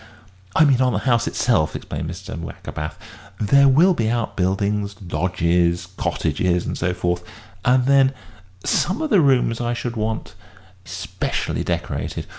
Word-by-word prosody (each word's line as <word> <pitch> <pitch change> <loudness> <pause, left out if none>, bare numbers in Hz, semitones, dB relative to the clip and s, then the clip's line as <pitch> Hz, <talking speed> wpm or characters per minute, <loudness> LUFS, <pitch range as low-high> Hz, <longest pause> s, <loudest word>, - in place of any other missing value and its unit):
"I 160 - +6
mean, 135 -3 +3
on 125 -1 +3
the - - +1
house 120 -2 +2
itself," 80 -11 +1
explained 80 - -5
Mr. 90 +2 -7
Wackerbath; 75 -2 -6 0.4
"there 140 +6 +5
will 160 +8 +5
be 115 -8 0
outbuildings, 100 -2 -1
lodges, 85 -1 0
cottages, 85 +3 0
and - - -3
so 90 0 -1
forth, 90 -1 -1 0.4
and 125 0 +3
then 135 0 +5 0.5
some 195 - +1
of 310 - -3
the 200 -5 +6
rooms 125 -5 +2
I 120 0 -1
should 120 0 -4
want 110 0 -3 0.5
specially - - -3
decorated. - - -3
110 Hz, 140 wpm, -21 LUFS, 90-130 Hz, 0.5 s, I